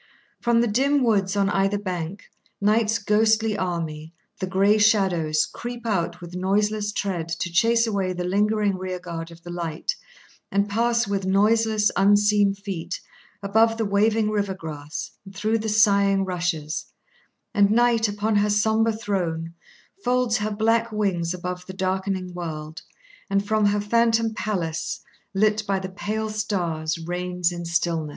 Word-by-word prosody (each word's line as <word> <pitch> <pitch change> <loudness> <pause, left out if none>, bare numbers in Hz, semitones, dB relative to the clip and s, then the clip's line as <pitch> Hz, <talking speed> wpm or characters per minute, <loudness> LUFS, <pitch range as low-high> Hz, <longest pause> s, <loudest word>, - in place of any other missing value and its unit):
From 235 -1 +3
the 240 - +2
dim 270 +5 +2
woods 200 -5 +2
on 200 -1 +3
either 195 +1 +1
bank, 185 -1 -4 0.4
Night's 215 +2 +2
ghostly 220 +1 +2
army, 165 -4 -4 0.2
the 185 - -2
grey 200 +3 +3
shadows, 180 -8 +3
creep 240 +3 -7
out 190 -7 -1
with 175 0 -9
noiseless 205 +3 0
tread 185 -5 -3
to 170 +1 -3
chase 230 +6 +3
away 200 -4 -1
the 180 0 -3
lingering 205 +1 +1
rear 185 -1 -4
guard 170 -2 -6
of 170 0 -15
the 175 - -8
light, 170 -2 -3 0.6
and 200 +1 +1
pass, 235 +2 +1
with 195 -1 -2
noiseless, 215 +2 +3
unseen 205 0 +4
feet, 190 -4 -5 0.4
above 225 +3 +3
the 225 - 0
waving 210 +2 +2
river 205 -2 -1
grass, 155 -2 -6
and 195 0 -13
through 215 +3 0
the 220 0 -3
sighing 200 -2 +4
rushes; 170 -4 -2 0.7
and 200 -1 +4
Night, 230 0 +3
upon 210 +1 0
her 205 +1 +2
sombre 220 +2 +2
throne, 175 -6 -2 0.5
folds 250 -2 +2
her 210 0 -1
black 225 +2 +1
wings 190 -6 0
above 180 0 -5
the 190 - -7
darkening 190 -1 -2
world, 160 -3 -6 0.5
and, 200 0 +1
from 215 -1 +3
her 205 0 +1
phantom 230 +1 +2
palace, 175 -7 -3 0.3
lit 215 +2 +3
by 195 -1 +1
the 190 0 -5
pale 215 +3 -3
stars, 175 -6 -2
reigns 180 +1 -2
in 175 -1 -6
stillness. 170 -2 0
200 Hz, 150 wpm, -24 LUFS, 180-215 Hz, 0.7 s, unseen